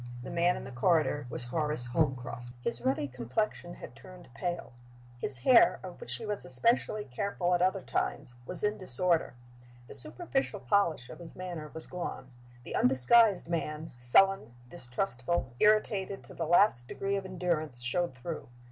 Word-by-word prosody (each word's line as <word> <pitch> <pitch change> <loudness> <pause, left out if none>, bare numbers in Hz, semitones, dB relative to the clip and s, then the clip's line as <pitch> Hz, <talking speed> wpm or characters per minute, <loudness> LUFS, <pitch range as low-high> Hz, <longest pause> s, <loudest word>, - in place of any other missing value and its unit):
The - - -7
man 170 +1 +2
in - - -7
the 130 - -9
corridor 145 +1 +1
was 120 - -2
Horace 150 0 -1
Holmcroft. 125 -3 -2
His 120 -1 -4
ruddy 135 +3 0
complexion 135 - -3
had 120 - -11
turned 180 -3 -14
pale. 175 0 -4 0.5
His 130 - +6
hair 340 - +5
(of - - -9
which 485 - -1
he 225 - -7
was 210 -1 -4
especially 215 - +1
careful 180 +6 -2
at 175 - +2
other 185 +1 +1
times) 120 - -3
was 180 +1 0
in 210 0 0
disorder. 175 -3 +4 0.5
The - - -10
superficial 210 - -2
polish 170 -11 +1
of - - -11
his 170 -2 -11
manner 175 -4 -6
was 160 - -7
gone; 155 -7 -6 0.3
the - - -6
undisguised 175 - +4
man, 160 -2 -3
sullen, 120 - +3
distrustful, 130 -1 -3
irritated 210 -2 +2
to - - -13
the 165 - -4
last 170 - +4
degree 195 +7 -2
of 195 - -2
endurance, 170 -8 -3
showed 130 +5 -1
through. 130 +2 -7
170 Hz, 160 wpm, -30 LUFS, 130-190 Hz, 0.5 s, His